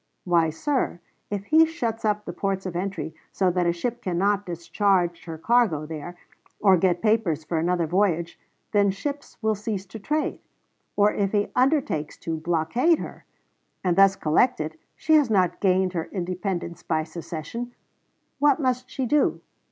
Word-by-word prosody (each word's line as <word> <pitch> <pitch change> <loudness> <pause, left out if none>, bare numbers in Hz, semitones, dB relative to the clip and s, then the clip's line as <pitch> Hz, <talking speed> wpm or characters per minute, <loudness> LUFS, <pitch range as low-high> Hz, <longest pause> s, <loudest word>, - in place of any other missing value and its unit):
Why, 170 -3 +3
sir, 255 - -1 0.3
if 200 -1 -3
he 315 +8 +6
shuts 235 -9 -3
up 210 -1 0
the 175 - -5
ports 195 +1 -2
of 180 -2 -4
entry 175 -4 -3 0.2
so 185 -2 +1
that 175 -1 +1
a - - +4
ship 235 +8 -3
cannot 195 +3 0
discharge 175 0 0
her 165 -2 -6
cargo 190 -5 +2
there, 160 +3 -7 0.4
or 195 -2 +6
get 180 +1 +1
papers 210 -9 +2
for 160 +1 -1
another 175 +1 +1
voyage, 170 -1 0 0.3
then 205 -2 +4
ships 285 +9 -5
will 220 0 +3
cease 205 -2 -4
to 220 +3 -9
trade; 300 +8 -1 0.6
or, 205 0 +4
if 200 0 -1
he 205 -1 +1
undertakes 260 - +1
to 165 -1 -4
blockade 170 - +2
her, - - -8 0.6
and 180 -2 +2
thus 195 0 +6
collect 165 +9 +2
it, 155 +1 -5 0.2
she 315 - +1
has 295 -5 +5
not 180 -4 +2
gained 185 -1 +2
her 165 -2 -2
independence 180 -2 -3
by 160 -1 0
secession. 170 +9 -6 0.6
What 290 +1 +4
must 255 -2 -1
she 265 - -2
do? 295 +4 +2
190 Hz, 165 wpm, -25 LUFS, 170-225 Hz, 0.6 s, he